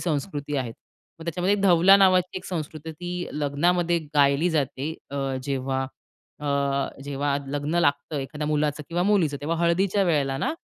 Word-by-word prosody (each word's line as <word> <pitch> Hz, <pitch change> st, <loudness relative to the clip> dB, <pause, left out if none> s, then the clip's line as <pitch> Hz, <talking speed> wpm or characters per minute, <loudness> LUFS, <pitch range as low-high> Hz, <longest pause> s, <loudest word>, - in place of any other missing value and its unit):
संस्कृती 145 Hz, -2 st, -2 dB
आहे. 125 Hz, -4 st, -2 dB, 0.5 s
मग 165 Hz, -, -9 dB
त्याच्यामध्ये 180 Hz, +4 st, +1 dB
धवला 185 Hz, +1 st, +7 dB
नावाची 185 Hz, -2 st, +3 dB
एक -, -, -16 dB
संस्कृती 160 Hz, -2 st, -5 dB
होती, 155 Hz, -, -9 dB, 0.3 s
ती -, -, -6 dB
लग्नामध्ये 170 Hz, +4 st, +1 dB, 0.2 s
गायली 145 Hz, +4 st, +4 dB
जाते 145 Hz, 0 st, -1 dB, 0.2 s
अ, 140 Hz, -, -5 dB, 0.3 s
जेव्हा 135 Hz, -1 st, -1 dB, 0.6 s
अ, 150 Hz, -, -5 dB, 0.6 s
जेव्हा 140 Hz, 0 st, -1 dB
लग्न 145 Hz, +3 st, -2 dB
लागतं 145 Hz, +1 st, 0 dB
एखाद्या 150 Hz, +2 st, -4 dB
मुलाचं 150 Hz, 0 st, 0 dB
किंवा 175 Hz, +1 st, 0 dB
मुलीचं 180 Hz, -8 st, +2 dB
तेव्हा 165 Hz, +3 st, -1 dB
हळदीच्या 185 Hz, +4 st, +2 dB
वेळेला 140 Hz, -6 st, +1 dB
ना, -, -, 0 dB
150 Hz, 150 wpm, -25 LUFS, 145-175 Hz, 0.6 s, धवला